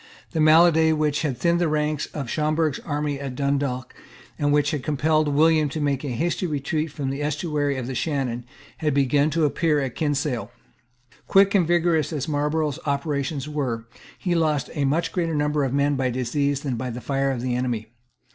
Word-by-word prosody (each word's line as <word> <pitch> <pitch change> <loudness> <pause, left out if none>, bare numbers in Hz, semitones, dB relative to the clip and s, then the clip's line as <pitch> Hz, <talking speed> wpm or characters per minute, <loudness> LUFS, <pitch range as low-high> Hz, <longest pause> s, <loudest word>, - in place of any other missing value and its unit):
The 160 - 0
malady 160 +1 +6
which 150 -2 0
had 140 -6 -1
thinned 170 +4 +2
the 175 - +3
ranks 150 -1 0
of 140 -4 -6
Schomberg's 155 +1 0
army 145 -2 -2
at 135 -2 -5
Dundalk, 140 -2 -1 0.5
and 145 0 +2
which 145 0 +3
had 150 - -2
compelled 155 +2 +1
William 155 +1 +3
to 155 - -4
make 140 -2 0
a - - -3
hasty 170 +8 -1
retreat 150 +1 -2
from 140 -2 -3
the 140 +2 -4
estuary 145 -1 -1
of 130 - -3
the 130 - -4
Shannon, 130 -4 -2 0.3
had 150 -3 0
begun 140 +2 +3
to 160 0 +1
appear 150 +1 +1
at 135 -3 -2
Kinsale. 145 -6 -1 0.8
Quick 195 0 +5
and 185 -5 +3
vigorous 170 -2 +2
as 145 -4 -3
Marlborough's 150 0 0
operations 140 0 -1
were, 130 -7 -3 0.3
he 180 - -1
lost 155 -5 0
a 145 -3 0
much 155 +5 0
greater 165 -3 -1
number 150 0 +1
of 135 - -1
men 140 +1 +2
by 130 -1 0
disease 135 +3 -1
than 135 -5 -2
by 130 +2 -3
the 120 +1 -5
fire 135 +1 -1
of 130 -3 -2
the 125 -1 -1
enemy. 120 -3 -2
145 Hz, 190 wpm, -24 LUFS, 135-155 Hz, 0.8 s, malady